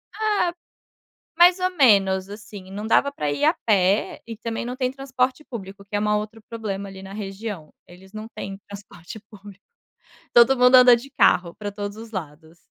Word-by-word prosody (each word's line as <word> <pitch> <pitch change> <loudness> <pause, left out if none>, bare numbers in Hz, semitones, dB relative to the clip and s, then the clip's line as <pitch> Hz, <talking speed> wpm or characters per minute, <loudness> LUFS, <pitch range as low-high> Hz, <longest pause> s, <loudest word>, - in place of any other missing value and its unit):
Ah. 415 -5 0 0.8
Mais 355 +2 +6
ou 365 - +1
menos, 195 -7 +4
assim, 205 -2 -11
não 205 +2 -6
dava 280 +5 +3
para 150 - -3
ir 145 - -1
a 315 - +5
pé 200 -2 +1
e 230 -1 -8
também 230 +1 -5
não 250 +1 -5
tem 255 -2 -1
transporte 265 +1 -2
público 200 -4 -9
que 205 +1 -4
é - - 0
ma 210 0 +1
um 210 - +1
outro 215 +1 -9
problema 200 -4 -5
ali 190 0 -11
na 195 0 -10
região, 195 -4 -7
eles 185 +2 -16
não 215 +1 -8
têm 195 -3 -7
transporte 200 -1 -11
público. 200 -1 -14 0.7
Todo 240 +3 +6
mundo 250 +1 +6
anda 250 -1 +8
de 270 +4 -10
carro 175 -9 +2
para 205 -1 -6
todos 205 0 -6
os 225 0 -10
lados. 160 -3 -8
210 Hz, 190 wpm, -23 LUFS, 195-250 Hz, 0.8 s, anda